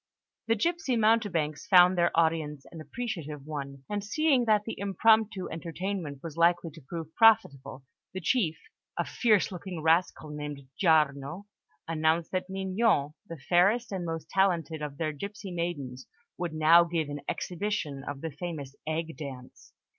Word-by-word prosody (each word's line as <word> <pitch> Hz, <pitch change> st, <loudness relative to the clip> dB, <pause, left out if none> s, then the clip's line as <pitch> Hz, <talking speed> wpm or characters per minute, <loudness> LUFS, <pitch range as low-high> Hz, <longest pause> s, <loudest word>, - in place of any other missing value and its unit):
The 225 Hz, -, +3 dB
gipsy 320 Hz, +2 st, 0 dB
mountebanks 205 Hz, -8 st, +1 dB
found 180 Hz, -2 st, +7 dB
their 175 Hz, -1 st, +3 dB
audience 160 Hz, -3 st, +1 dB
an 165 Hz, -, -9 dB
appreciative 155 Hz, -, -5 dB
one; 140 Hz, -3 st, -6 dB
and 205 Hz, -1 st, -3 dB
seeing 260 Hz, +3 st, +2 dB
that 215 Hz, -2 st, +3 dB
the 225 Hz, -, -4 dB
impromptu 205 Hz, +1 st, +2 dB
entertainment 165 Hz, -3 st, -5 dB
was 165 Hz, -3 st, -7 dB
likely 170 Hz, 0 st, +3 dB
to 160 Hz, +2 st, -14 dB
prove 160 Hz, +3 st, -7 dB
profitable, 140 Hz, -, +3 dB, 0.3 s
the 190 Hz, -, -5 dB
chief, 175 Hz, -4 st, +1 dB, 0.4 s
a -, -, 0 dB
fierce 215 Hz, -5 st, +2 dB
looking 180 Hz, -1 st, -6 dB
rascal 160 Hz, -1 st, +1 dB
named 150 Hz, -1 st, -6 dB
Giarno, 155 Hz, +1 st, +1 dB, 0.4 s
announced 160 Hz, +1 st, +1 dB
that 185 Hz, 0 st, -2 dB
Mignon, 190 Hz, -5 st, +1 dB, 0.2 s
the 165 Hz, -, -6 dB
fairest 195 Hz, -, +2 dB
and 190 Hz, -2 st, -3 dB
most 165 Hz, -2 st, -4 dB
talented 170 Hz, -5 st, +1 dB
of 145 Hz, -2 st, -5 dB
their 155 Hz, -1 st, -1 dB
gipsy 200 Hz, +6 st, -7 dB
maidens, 145 Hz, -7 st, -4 dB, 0.3 s
would 175 Hz, -2 st, -3 dB
now 160 Hz, +2 st, +7 dB
give 165 Hz, -2 st, -2 dB
an 145 Hz, 0 st, -6 dB
exhibition 175 Hz, -7 st, -3 dB
of 145 Hz, -1 st, -6 dB
the 165 Hz, -, -4 dB
famous 145 Hz, -3 st, -6 dB
egg 160 Hz, +1 st, -2 dB
dance. 130 Hz, -4 st, -9 dB
170 Hz, 150 wpm, -29 LUFS, 150-195 Hz, 0.4 s, found